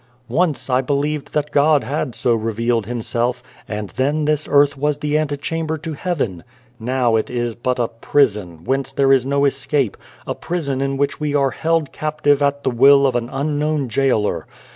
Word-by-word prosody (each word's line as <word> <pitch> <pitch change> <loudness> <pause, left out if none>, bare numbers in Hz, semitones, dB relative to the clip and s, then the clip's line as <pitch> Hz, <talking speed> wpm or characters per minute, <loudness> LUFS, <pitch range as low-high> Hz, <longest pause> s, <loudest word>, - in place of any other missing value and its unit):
"Once 160 +4 0
I 130 -1 +2
believed 145 +2 -2
that 150 0 0
God 145 0 +4
had 140 -3 -3
so 120 - +1
revealed 115 0 -1
Himself, 120 +1 -2 0.2
and 105 -2 -5
then 145 +3 0
this 150 0 0
earth 145 0 +4
was 145 +1 0
the 150 0 -2
ante 150 -2 0
chamber 160 +2 -3
to 160 +1 -6
heaven. 140 - -3 0.4
Now 120 0 +1
it 110 - -2
is 120 -1 -2
but 125 +2 -2
a 120 -2 +1
prison, 105 - 0
whence 135 +3 -1
there 135 0 +3
is 130 -1 +2
no 140 +1 +2
escape 135 -3 0 0.3
a - - -2
prison 145 -6 -3
in 135 0 -1
which 140 +1 -1
we 150 -1 -1
are 140 -2 +2
held 160 +1 0
captive 150 -2 +1
at 140 0 +1
the 130 - +1
will 140 +3 +6
of 130 -2 +1
an 120 0 -1
Unknown 145 0 -1
Gaoler. 120 -3 0
140 Hz, 185 wpm, -20 LUFS, 120-150 Hz, 0.4 s, will